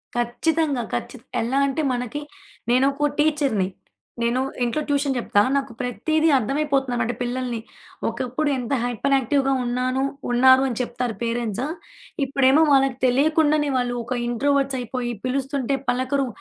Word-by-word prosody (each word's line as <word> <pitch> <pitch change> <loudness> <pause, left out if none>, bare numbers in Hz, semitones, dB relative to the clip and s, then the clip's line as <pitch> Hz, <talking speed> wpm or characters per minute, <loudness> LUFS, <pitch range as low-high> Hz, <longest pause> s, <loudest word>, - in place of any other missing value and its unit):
ఖచ్చితంగా. 275 +3 0
ఖచ్చిత 255 - -4 0.2
ఎలా 255 +5 0
అంటే 275 +3 -1
మనకి 250 +4 -3 0.5
నేను 255 +2 +4
ఒకో 295 +1 0
టీచర్‌ని. 290 -11 +2 0.5
నేను 235 +2 +1 0.2
ఇంట్లో 245 +6 0
ట్యూషన్ 280 -2 +1
చెప్తా, 205 -3 +2
నాకు 270 -3 -1
ప్రతిది 310 +6 +1
అర్థమయిపోతుందన్నమాట. 265 -2 0
పిల్లల్ని 245 -1 -3 0.5
ఒకప్పుడు 260 +4 -2
ఎంత 250 +2 -3
హైపర్ 245 +3 +1
యాక్టివ్‌గా 270 +1 +1
ఉన్నాను 255 +2 0 0.3
ఉన్నారని 260 +1 +5
చెప్తారు 240 -2 -3
పేరెంట్సు. 235 +2 -2 0.6
ఇప్పుడేమో 275 +2 +4
వాళ్ళకి 270 -2 +3
తెలియకుండానే 300 +3 +3
వాళ్ళు 245 -1 0
ఒక 245 +2 -3
ఇంట్రోవర్ట్స్ 275 +2 +1
అయిపోయి, 245 0 -3
పిలుస్తుంటే 270 +1 -1
పలకరు. 260 +2 0
260 Hz, 120 wpm, -23 LUFS, 245-280 Hz, 0.6 s, ఉన్నారని